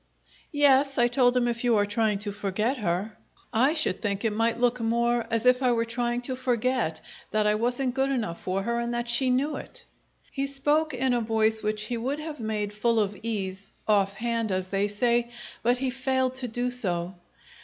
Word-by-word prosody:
"Yes," 275 -1 +4
I 240 -1 +5
told 245 0 +3
him, 240 -1 +2
"if 235 0 -2
you 240 -2 +3
are 205 - +3
trying 210 0 0
to 205 - -2
forget 205 +6 -1
her." 200 +1 -2 0.4
"I 260 +8 +3
should 310 - +1
think 205 0 -2
it 220 - +1
might 225 +2 +1
look 245 +1 +1
more 235 0 +1
as 230 0 0
if 250 +1 +5
I 250 -2 +3
were 230 0 +1
trying 240 +1 -2
to 255 +1 -3
forget 250 -7 -1 0.3
that 215 0 +1
I 210 - +4
wasn't 245 +4 0
good 270 +1 +1
enough 225 -11 -2
for 190 +1 -2
her 235 +2 -1
and 235 0 -2
that 240 0 -2
she 240 +2 +3
knew 280 +4 +1
it!" 485 -1 -10 0.5
He 275 0 -2
spoke 290 +2 +1
in 255 0 +1
a 240 - +1
voice 220 0 +1
which 215 0 -1
he 235 +2 -3
would 260 +5 -2
have 305 -1 -7
made 210 -2 -3
full 230 +2 +1
of 205 -1 0
ease 195 -4 -4 0.2
"off 200 -2 +2
hand," 230 0 -1
as 185 0 -2
they 200 +1 +1
say; 235 +3 +1 0.3
but 245 +2 +2
he 260 0 -1
failed 260 0 0
to 260 -1 -3
do 245 +2 -2
so. 180 -7 -1
235 Hz, 210 wpm, -26 LUFS, 210-255 Hz, 0.5 s, I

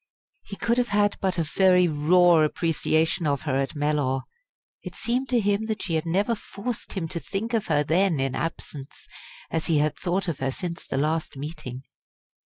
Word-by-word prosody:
He 200 - -9
could 235 +4 +1
have 245 - +1
had 205 -1 +2
but 190 -1 0
a 165 - +2
very 180 +3 +4
raw 170 +3 +5
appreciation 160 +1 +1
of 140 -2 0
her 145 -4 -1
at 135 +3 -2
Mellor. 145 -3 0 0.6
It - - -8
seemed 250 +3 -1
to 245 -2 +3
him 205 +1 +1
that 220 -1 -3
she 170 - -2
had 160 +1 0
never 200 +7 +1
forced 225 +1 -6
him 180 -5 -2
to 170 - -3
think 220 +7 -4
of 225 -3 0
her 145 - +2
then 170 +1 +2
in 135 -1 0
absence, 145 -2 -6 0.5
as 165 -1 -1
he 165 - +3
had 150 0 +1
thought 185 +2 -1
of 165 -5 -2
her 135 - 0
since 170 +5 -5
the - - -2
last 155 +1 -1
meeting. 140 -3 -6
165 Hz, 195 wpm, -25 LUFS, 150-200 Hz, 0.6 s, raw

